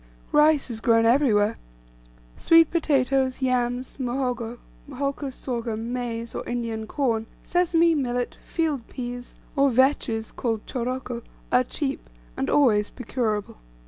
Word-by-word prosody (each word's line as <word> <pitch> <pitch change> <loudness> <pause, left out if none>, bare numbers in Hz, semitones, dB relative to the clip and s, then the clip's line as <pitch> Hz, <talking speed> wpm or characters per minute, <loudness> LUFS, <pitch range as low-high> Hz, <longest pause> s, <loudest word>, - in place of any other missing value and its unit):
Rice 300 -3 +4
is 225 -1 -3
grown 230 -1 +4
everywhere; 230 -4 +3 0.8
sweet 330 -1 +5
potatoes, 270 -5 +1
yams, 250 0 0
muhogo, 245 -2 -2 0.3
holcus 275 0 -3
sorghum, 235 -2 -4
maize, 235 -2 -4
or - - -4
Indian 230 -2 -3
corn, 230 -4 0 0.2
sesame, 340 -1 +3
millet, 245 -4 -1
field 305 -8 -2
peas, 245 -1 -7 0.2
or 275 -1 +4
vetches, 250 -3 +1
called 225 -3 -2
choroko, 250 -1 -3 0.3
are 250 - +5
cheap, 270 - -4 0.3
and - - -2
always 215 -8 +4
procurable. 220 - -3
250 Hz, 115 wpm, -25 LUFS, 230-275 Hz, 0.8 s, sweet